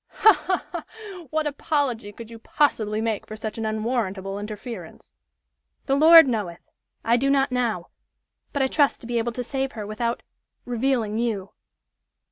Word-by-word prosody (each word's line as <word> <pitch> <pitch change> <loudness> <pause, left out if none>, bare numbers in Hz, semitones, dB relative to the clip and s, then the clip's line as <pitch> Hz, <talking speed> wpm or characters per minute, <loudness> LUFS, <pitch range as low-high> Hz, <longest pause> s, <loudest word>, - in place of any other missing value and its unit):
"Ha! 435 - +5
ha! 370 0 -2
ha! 395 -7 -9
What 310 +2 0
apology 280 -7 -1
could 230 +2 -11
you 230 - -10
possibly 220 -6 +1
make 225 -2 -2
for 215 - -7
such 220 +1 -5
an 220 - -1
unwarrantable 215 -3 -2
interference?" 210 -3 -8 0.7
"The 270 - +1
Lord 320 +1 +9
knoweth! 205 -8 -3 0.4
I 235 +1 +4
do 275 +3 +1
not 275 -1 +2
now. 235 -8 -1 0.6
But 285 -2 0
I - - +3
trust 285 +1 +2
to 230 - -9
be 240 -1 0
able 230 +1 -2
to 250 - -3
save 270 +2 -3
her 215 -2 -6
without 230 +3 -2 0.4
revealing 240 -3 0
you." 210 -5 -2
235 Hz, 160 wpm, -24 LUFS, 215-275 Hz, 0.7 s, Lord